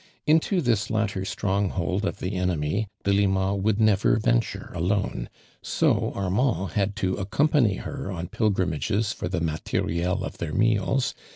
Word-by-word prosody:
Into 160 Hz, +4 st, +3 dB
tbi> 115 Hz, -5 st, +1 dB
latter 105 Hz, -4 st, -1 dB
stronghold 95 Hz, 0 st, -1 dB
of -, -, -2 dB
the 95 Hz, +2 st, -4 dB
enemy 90 Hz, +2 st, 0 dB, 0.2 s
Delima 100 Hz, -1 st, +2 dB
would 100 Hz, +2 st, +1 dB
never 105 Hz, -3 st, +4 dB
venture 110 Hz, -3 st, 0 dB
alone, 95 Hz, +4 st, -1 dB, 0.3 s
so -, -, +1 dB
Arniand 100 Hz, 0 st, 0 dB
had 100 Hz, -1 st, 0 dB
to 95 Hz, -3 st, -1 dB
accompany 120 Hz, +2 st, +2 dB
her 95 Hz, -, -5 dB
on 85 Hz, -1 st, -4 dB
pil 110 Hz, +4 st, +1 dB
grimages 95 Hz, +3 st, 0 dB
for -, -, -4 dB
the 90 Hz, -1 st, -2 dB
moli'rUI 80 Hz, +1 st, -1 dB, 0.2 s
of -, -, -6 dB
their 80 Hz, -3 st, -3 dB
meals 115 Hz, +4 st, +2 dB
100 Hz, 145 wpm, -25 LUFS, 90-110 Hz, 0.3 s, never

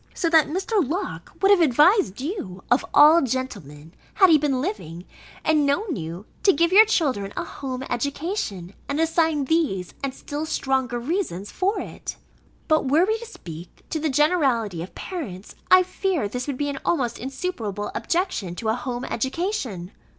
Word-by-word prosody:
So 335 Hz, -, 0 dB
that 320 Hz, -2 st, +6 dB
Mr. 380 Hz, +5 st, 0 dB
Locke 335 Hz, +9 st, -4 dB
would 390 Hz, -, +6 dB
have 395 Hz, -3 st, +6 dB
advised 305 Hz, -, +4 dB
you, 260 Hz, -, -5 dB
of 245 Hz, -, +4 dB
all 310 Hz, +3 st, +7 dB
gentlemen, 200 Hz, -, -4 dB, 0.2 s
had 380 Hz, -3 st, +6 dB
he 310 Hz, -, +6 dB
been 280 Hz, -3 st, 0 dB
living, 185 Hz, -, -5 dB, 0.4 s
and 310 Hz, -1 st, +3 dB
known 315 Hz, +5 st, 0 dB
you, 170 Hz, +3 st, -6 dB, 0.2 s
to 395 Hz, -, +6 dB
give 340 Hz, +1 st, +2 dB
your 425 Hz, +3 st, +8 dB
children 260 Hz, -, 0 dB
a -, -, -1 dB
home 260 Hz, -2 st, -6 dB
education, 255 Hz, -, -3 dB, 0.2 s
and 285 Hz, +2 st, -1 dB
assign 320 Hz, -3 st, +2 dB
these, 265 Hz, -, 0 dB
and 275 Hz, -, -1 dB
still 295 Hz, +3 st, -5 dB
stronger 265 Hz, -5 st, 0 dB
reasons 240 Hz, -, -3 dB
for 385 Hz, +3 st, 0 dB
it. -, -, -6 dB, 0.5 s
But 310 Hz, -4 st, +2 dB
were 315 Hz, +6 st, +4 dB
we 440 Hz, +2 st, 0 dB
to 470 Hz, -, -9 dB
speak 170 Hz, -, -11 dB
to 315 Hz, -, -1 dB
the 310 Hz, 0 st, 0 dB
generality 265 Hz, -, +2 dB
of 180 Hz, -, -9 dB
parents, 215 Hz, -, -6 dB, 0.2 s
I 370 Hz, 0 st, +7 dB
fear 370 Hz, -, -1 dB
this 250 Hz, +5 st, -5 dB
would 280 Hz, -3 st, -3 dB
be 290 Hz, +1 st, -1 dB
an 275 Hz, -1 st, -4 dB
almost 250 Hz, -8 st, 0 dB
insuperable 245 Hz, -, -4 dB
objection 335 Hz, -, -2 dB
to 220 Hz, +3 st, -3 dB
a -, -, +3 dB
home 245 Hz, +1 st, -4 dB
education. 260 Hz, -, -3 dB
280 Hz, 170 wpm, -24 LUFS, 225-340 Hz, 0.5 s, your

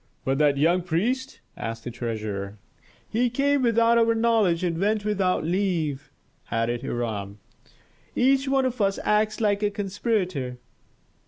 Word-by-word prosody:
"But 135 Hz, +1 st, 0 dB
that 145 Hz, -2 st, +3 dB
young 170 Hz, +5 st, +3 dB
priest?" 230 Hz, +11 st, -2 dB
asked 115 Hz, 0 st, -5 dB
the 120 Hz, -, -5 dB
treasurer. 105 Hz, -4 st, -4 dB, 0.5 s
"He 240 Hz, +3 st, +1 dB
came 280 Hz, +3 st, +1 dB
without 230 Hz, -1 st, +4 dB
our 230 Hz, 0 st, +3 dB
knowledge 220 Hz, -7 st, +2 dB
and 170 Hz, -2 st, -1 dB
went 210 Hz, +2 st, +1 dB
without 195 Hz, -5 st, +1 dB
leave," 165 Hz, -5 st, -1 dB, 0.4 s
added 115 Hz, +1 st, -1 dB
Hiram. 105 Hz, -4 st, -4 dB, 0.8 s
"Each 270 Hz, +2 st, +3 dB
one 270 Hz, -1 st, +2 dB
of 250 Hz, -2 st, -2 dB
us 195 Hz, -1 st, +2 dB
acts 215 Hz, 0 st, +1 dB
like 205 Hz, -2 st, +1 dB
a 210 Hz, -, +2 dB
conspirator." 190 Hz, -, -2 dB
195 Hz, 140 wpm, -25 LUFS, -, 0.8 s, without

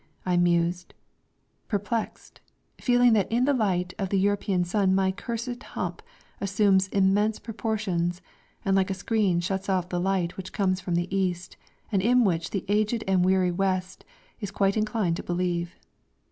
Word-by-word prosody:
I 180 Hz, -1 st, +1 dB
mused, 175 Hz, 0 st, +1 dB, 0.7 s
perplexed, 210 Hz, +2 st, -3 dB, 0.4 s
feeling 245 Hz, -1 st, +4 dB
that 210 Hz, -1 st, +1 dB
in 240 Hz, +2 st, +2 dB
the 285 Hz, -, +3 dB
light 185 Hz, -7 st, 0 dB
of 195 Hz, -2 st, -1 dB
the 195 Hz, -, +1 dB
European 195 Hz, -1 st, +1 dB
sun 190 Hz, +1 st, +1 dB
my 190 Hz, 0 st, +2 dB
cursed 235 Hz, +4 st, -5 dB
hump -, -, -5 dB, 0.4 s
assumes 195 Hz, -1 st, +2 dB
immense 200 Hz, +3 st, +2 dB
proportions 205 Hz, -6 st, -2 dB, 0.5 s
and 195 Hz, 0 st, +2 dB
like 190 Hz, 0 st, +2 dB
a 195 Hz, -, -1 dB
screen 190 Hz, -3 st, +1 dB
shuts 190 Hz, +2 st, -3 dB
off 185 Hz, -2 st, 0 dB
the 175 Hz, -, -1 dB
light 185 Hz, -2 st, -1 dB
which 185 Hz, -1 st, -7 dB
comes 185 Hz, -2 st, 0 dB
from 180 Hz, -1 st, -2 dB
the 175 Hz, +2 st, -1 dB
East, 180 Hz, -2 st, -2 dB, 0.4 s
and 195 Hz, -3 st, +2 dB
in 245 Hz, +4 st, +4 dB
which 170 Hz, -5 st, 0 dB
the 195 Hz, -, -3 dB
aged 215 Hz, +3 st, +1 dB
and 190 Hz, -2 st, +3 dB
weary 185 Hz, -1 st, +3 dB
West 185 Hz, 0 st, -2 dB, 0.4 s
is 205 Hz, -4 st, -4 dB
quite 195 Hz, -1 st, +1 dB
inclined 215 Hz, -5 st, 0 dB
to -, -, -6 dB
believe. 175 Hz, 0 st, -2 dB
190 Hz, 160 wpm, -26 LUFS, 180-210 Hz, 0.7 s, feeling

